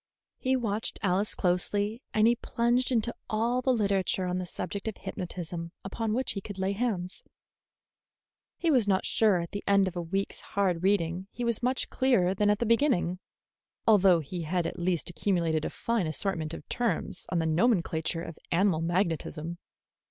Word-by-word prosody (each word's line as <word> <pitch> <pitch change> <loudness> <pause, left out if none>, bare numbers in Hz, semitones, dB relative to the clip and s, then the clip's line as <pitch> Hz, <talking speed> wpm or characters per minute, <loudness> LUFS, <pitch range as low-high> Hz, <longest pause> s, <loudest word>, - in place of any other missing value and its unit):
He 260 0 +1
watched 225 -3 -1
Alice 195 +2 +2
closely, 205 +5 +1
and 215 0 +3
he 235 +1 +5
plunged 240 +2 +1
into 235 -1 +1 0.2
all 235 +4 +1
the 260 - +2
literature 200 -5 +1
on 180 0 -1
the 180 - -4
subject 200 +4 -4
of 220 - -3
hypnotism 170 -1 -6
upon 215 +2 -2
which 260 +2 0
he 195 - -4
could 200 0 -8
lay 190 +1 0
hands. 200 -4 -2 1.3
He 335 - +1
was 245 -7 +3
not 190 -2 +2
sure 205 -6 +3
that - - -2
at 170 - -9
the 205 - -5
end 200 -1 +4
of 185 - -5
a 175 - -2
week's 195 +4 -3
hard 185 -4 0
reading 185 -1 +1
he 245 - -5
was 235 -1 +1
much 255 +2 0
clearer 220 -9 +3
than 205 +1 +2
at 210 - +3
the 235 - -1
beginning, 230 - +2 0.7
although 195 -6 +5
he 170 +4 -5
had 170 +2 -1
at - - -4
least 175 -1 -1
accumulated 170 -5 0
a - - -1
fine 230 -7 -1
assortment 160 -1 -2
of - - -11
terms 220 -7 -1
in 180 - +1
the 165 - +1
nomenclature 165 -2 +1
of 165 - -8
animal 175 -2 +2
magnetism. 170 -1 -1
195 Hz, 180 wpm, -29 LUFS, 175-225 Hz, 1.3 s, he